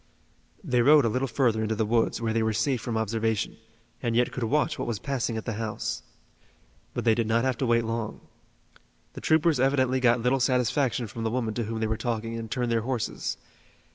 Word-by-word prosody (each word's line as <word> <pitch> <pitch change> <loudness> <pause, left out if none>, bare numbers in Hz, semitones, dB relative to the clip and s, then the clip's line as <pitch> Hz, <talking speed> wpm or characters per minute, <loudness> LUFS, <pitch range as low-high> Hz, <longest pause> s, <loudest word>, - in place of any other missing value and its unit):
They 125 -8 +2
rode 145 +2 +6
a - - +3
little 130 +5 0
further 115 -3 +1
into 110 0 -1
the 110 0 0
woods 115 +2 +1
where 115 -1 -1
they 115 - +1
were 110 0 +1
safe 115 +3 0
from 115 -2 -2
observation, 110 0 -1 0.4
and 120 -2 -1
yet 125 +1 +2
could 130 - -5
watch 145 +7 +1
what - - -2
was 115 -3 -1
passing 125 -2 -2
at 110 - -5
the 115 - -2
house. 110 -1 -3 0.9
But - - -2
they 115 - +5
did 115 0 0
not 115 +2 +2
have 130 -2 0
to 130 - 0
wait 115 0 +3
long. 115 -1 -3 0.9
The - - -8
troopers 160 -2 +3
evidently 130 -1 +2
got 120 -1 +4
little 125 +3 +2
satisfaction 125 0 +1
from 115 +2 -6
the 110 - 0
woman 115 -2 -1
to 115 0 -2
whom 110 +1 -4
they - - +1
were 110 0 -1
talking 115 -1 -3
and 115 -1 -5
turned 125 0 -1
their 115 -1 +2
horses. 120 0 -3
115 Hz, 215 wpm, -27 LUFS, 110-130 Hz, 0.9 s, rode